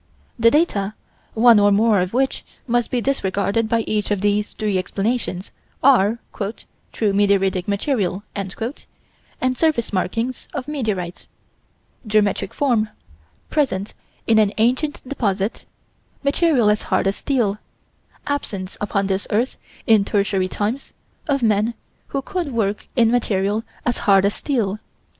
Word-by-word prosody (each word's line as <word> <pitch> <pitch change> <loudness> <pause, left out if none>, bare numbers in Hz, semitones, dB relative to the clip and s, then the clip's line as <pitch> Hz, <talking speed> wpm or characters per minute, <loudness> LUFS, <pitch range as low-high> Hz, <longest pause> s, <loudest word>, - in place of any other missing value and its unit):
The 230 0 +6
data, 215 - +1 0.4
one 230 -1 +7
or 205 0 +5
more 210 -1 +4
of 180 +1 -2
which 265 +2 0 0.2
must 240 -1 +1
be 245 - 0
disregarded 220 -3 0
by 230 0 +2
each 215 -1 -1
of 205 -2 0
these 205 0 +1
three 210 -3 0
explanations, 195 0 -2 0.3
are: 235 -5 +5 0.7
"true 210 -3 0
meteoritic 195 -2 +2
material" 200 -2 -1
and 195 -2 -4 1.0
surface 290 -8 +1
markings 225 +7 -2
of 275 -2 -4
meteorites; 210 - -3 0.8
geometric 210 -2 +1
form; 235 -7 +1 0.6
presence 220 -10 0 0.3
in 220 -1 +4
an 210 -1 +3
ancient 255 +6 0
deposit; 205 -6 -2 0.6
material 280 -6 +3
as 210 - 0
hard - - +2
as 195 +1 0
steel; 225 -7 0 0.7
absence 205 -10 -4
upon 200 -1 0
this 195 0 -1
earth, 235 +5 0 0.3
in 220 -3 +5
Tertiary 200 -2 +1
times, 215 +8 -3 0.4
of 275 -3 +1
men 215 +1 +2 0.3
who 275 -1 -3
could 350 -4 -3
work 210 -3 -1
in 230 -3 +4
material 210 -2 +1 0.2
as 245 - 0
hard 195 -2 +4
as 200 - +2
steel. 215 -8 -1
215 Hz, 130 wpm, -21 LUFS, 200-245 Hz, 1.0 s, one